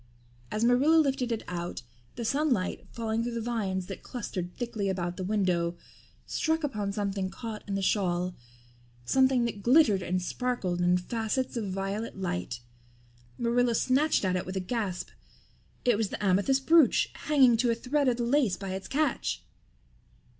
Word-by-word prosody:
As 215 - -1
Marilla 250 +7 +4
lifted 270 -6 +2
it 225 - -2
out, 175 -4 -4 0.3
the 235 - -4
sunlight, 265 -7 0
falling 225 -1 -2
through 235 0 -3
the - - -1
vines 210 -6 -2
that 195 0 -7
clustered 190 -8 -5
thickly 230 -5 -2
about 175 -2 -2
the 185 - -5
window, 180 -4 0 0.5
struck 320 0 0
upon 210 -8 -2
something 195 -2 -2
caught 220 +1 -6
in 200 - -2
the 195 - -1
shawl 180 -2 +1 0.7
something 260 - +3
that 215 -3 -4
glittered 235 -4 +5
and 185 0 -1
sparkled 185 -3 -2
in 180 0 +4
facets 225 +7 -2
of 220 -4 -2
violet 195 +3 -3
light. 120 - -3 0.8
Marilla 240 0 +2
snatched 265 0 +2
at 185 -1 +1
it 180 - -1
with 185 +1 -5
a - - +1
gasp. 190 -2 -3 0.8
It 240 -4 +4
was 220 -3 0
the - - -5
amethyst 205 +9 +2
brooch, 325 -4 +5 0.2
hanging 265 -5 +6
to 240 +1 +2
a 230 - +2
thread 275 +4 0
of 245 -2 +2
the 240 - -1
lace 240 -5 +2
by 195 -1 -5
its 190 +1 -5
catch! 305 +2 -1
220 Hz, 165 wpm, -29 LUFS, 190-250 Hz, 0.8 s, hanging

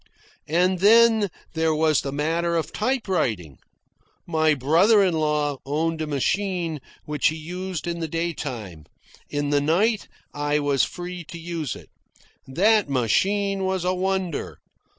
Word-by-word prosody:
And 180 +3 +2
then 220 +1 +5 0.2
there 160 -1 +1
was 155 -1 +2
the 135 - -4
matter 165 +4 0
of 160 - -3
typewriting. 180 - -1 0.7
My 155 -2 +2
brother 170 - +4
in 185 -3 +2
law 150 -3 0
owned 160 +3 -1
a 155 - -2
machine 170 +2 -1 0.3
which 150 -2 +1
he 160 - 0
used 180 +2 -5
in 170 0 -3
the 165 - -2
day 165 +2 -2
time. 105 - -7 0.4
In 145 0 -2
the 145 -1 +3
night 200 +9 +1 0.3
I 145 0 0
was 145 -2 +2
free 175 0 -5
to 170 +1 -9
use 165 -5 -4
it. - - -13 0.6
That 205 +7 +3
machine 195 - +1
was 190 -1 -1
a 180 - +2
wonder. 185 -3 -2
165 Hz, 145 wpm, -24 LUFS, 145-190 Hz, 0.7 s, then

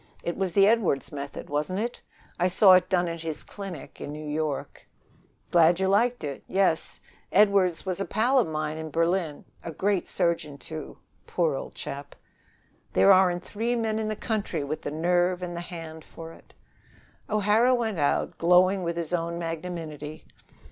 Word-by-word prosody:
It 170 - -2
was 190 -3 -2
the 195 +1 +6
Edwardes 210 -10 +2
method, 140 -1 -7
wasn't 150 +6 -2
it? 240 +3 -3 0.4
I 180 - +3
saw 190 +1 +6
it 185 0 +4
done 180 -2 +2
at 165 -1 -5
his 160 -2 -4
clinic 195 -7 -9
in - - -5
New 150 +1 -7
York." 150 -1 -3 0.6
"Glad 170 +1 +5
you 190 - +1
liked 235 +5 +2
it. 140 -2 -5
Yes. 190 -4 +1 0.3
Edwardes 200 -4 +3
was 185 0 -2
a - - -1
pal 250 +5 +2
at 235 - +2
mine 155 0 -3
in 160 0 -5
Berlin. 165 -1 0 0.2
A 165 - -5
great 195 +3 0
surgeon, 170 -5 -1
too, 155 +1 -8 0.3
poor 165 -4 +1
old 135 - -6
chap!" 140 +1 -7 0.8
"There 195 - +6
aren't 180 -1 +3
three 230 +5 -2
men 220 -2 -1
in 220 - -2
the 215 - -2
country 205 -8 -2
with 150 +2 -4
the - - -4
nerve 175 +3 +1
and 175 -1 -4
the 170 - -4
hand 165 -3 -8
for 165 0 -10
it." - - -19 0.7
O'Hara 215 +4 +3
went 220 -7 -2
out, 145 - 0
glowing 180 +3 +4
with 170 -1 -3
his 170 0 -3
own 170 0 -1
magnanimity. 165 -2 -6
175 Hz, 175 wpm, -26 LUFS, 160-195 Hz, 0.8 s, the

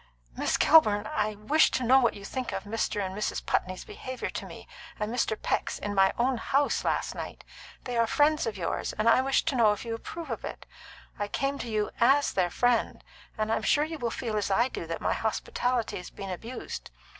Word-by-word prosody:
"Miss - - 0
Kilburn, 215 -10 +5
I 215 0 -1
wish 280 +10 +3
to 260 - -1
know 260 +3 +6
what 235 -3 +2
you 200 - -9
think 255 +4 -4
of 195 - -3
Mr. 205 -1 -1
and 190 0 -5
Mrs. 210 - -2
Putney's 185 0 -1
behaviour 255 -1 -6
to - - -5
me, - - -11 0.3
and 210 +2 -2
Mr. 225 -3 0
Peck's, - - -1
in 205 - -4
my 195 -1 +4
own 255 +1 +2
house, 275 +5 +1
last - - 0
night. - - -7 0.4
They 245 -2 -3
are 230 - +3
friends 300 +3 +3
of 215 -3 -3
yours, 170 - -2
and 215 +2 -1
I 230 - +6
wish 270 0 +2
to 305 -5 0
know 220 -4 +5
if 210 - -7
you 230 - -3
approve 325 +8 -6
of - - -4
it. - - -7 0.5
I 205 - -1
come 275 +6 -1
to - - -5
you 215 -1 -1
as 275 +5 +4
their 180 -2 +2
friend, 245 +4 +1 0.3
and 215 0 -1
I - - +3
am - - -3
sure 295 - +3
you 315 0 -5
will 240 -2 -1
feel 225 -2 -3
as 205 - -1
I 235 +6 +3
do 170 - -6
that 165 - -4
my - - +1
hospitality 235 +1 -1
has 180 - -8
been 195 -1 -7
abused. 225 +8 -6
225 Hz, 225 wpm, -28 LUFS, 205-260 Hz, 0.5 s, know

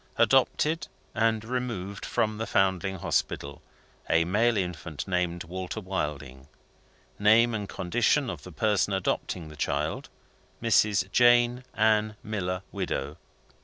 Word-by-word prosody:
Adopted, 155 +1 +2 0.3
and 110 0 +1
removed 115 -6 -4
from 110 -1 0
the 115 - -3
Foundling 95 -1 +1
Hospital, 70 -4 -2 0.5
a 85 0 +4
male 110 +5 +2
infant, 90 -5 -4
named 90 -2 -1
Walter 90 +2 -5
Wilding. 75 -8 -4 0.7
Name 115 +3 +5
and 105 -3 -3
condition 120 +9 +1
of - - -5
the 90 - -11
person 105 +3 +1
adopting 90 -3 -2
the 75 - -11
child 75 - -2 0.5
Mrs. 105 -4 +2
Jane 120 +1 +4
Ann 110 0 +2
Miller, 95 -3 -3
widow. 70 +3 -3
100 Hz, 120 wpm, -27 LUFS, 90-110 Hz, 0.7 s, Name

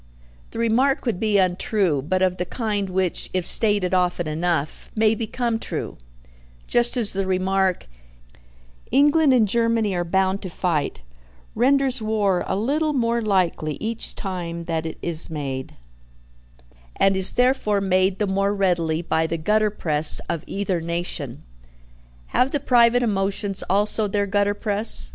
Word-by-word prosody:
The - - -10
remark 250 +6 +1
would 225 -7 -1
be 215 -2 +1
untrue, 185 -4 +1
but 185 +6 -1
of 185 -1 +1
the - - -1
kind 205 -3 -3
which, 185 -1 -2
if 185 -2 0
stated 205 -4 +1
often 180 -2 0
enough, 155 -1 -2
may 220 0 +3
become 230 +1 -2
true; - - -5 0.7
just 240 +1 +4
as 225 -4 0
the 195 0 -2
remark, 190 0 0 1.0
"England 290 +3 +4
and 235 -4 +4
Germany 230 -1 +1
are 175 -1 -1
bound 190 +2 0
to 185 - -6
fight," 165 - -2 0.5
renders 265 +1 +2
war 210 -4 0
a - - -1
little 295 +9 0
more 235 -3 0
likely 180 -7 0
each 225 +1 -4
time 170 -3 -5
that 165 -1 -3
it 160 - -7
is 170 -2 +1
made, 135 -4 -5 1.2
and 195 0 +3
is 190 0 +2
therefore 245 -5 +2
made 190 0 +1
the 210 - 0
more 195 +1 0
readily 170 -4 0
by 160 -1 0
the 165 - -3
gutter 210 +6 +1
press 155 -6 +3
of 170 -2 -3
either 195 -3 -2
nation. 170 +1 -4 0.9
Have 255 - +2
the 290 - -1
private 245 -2 +4
emotions 195 -2 -1
also 210 +2 +1
their 205 0 0
gutter 205 +1 0
press? 205 - +3
195 Hz, 150 wpm, -22 LUFS, 180-225 Hz, 1.2 s, just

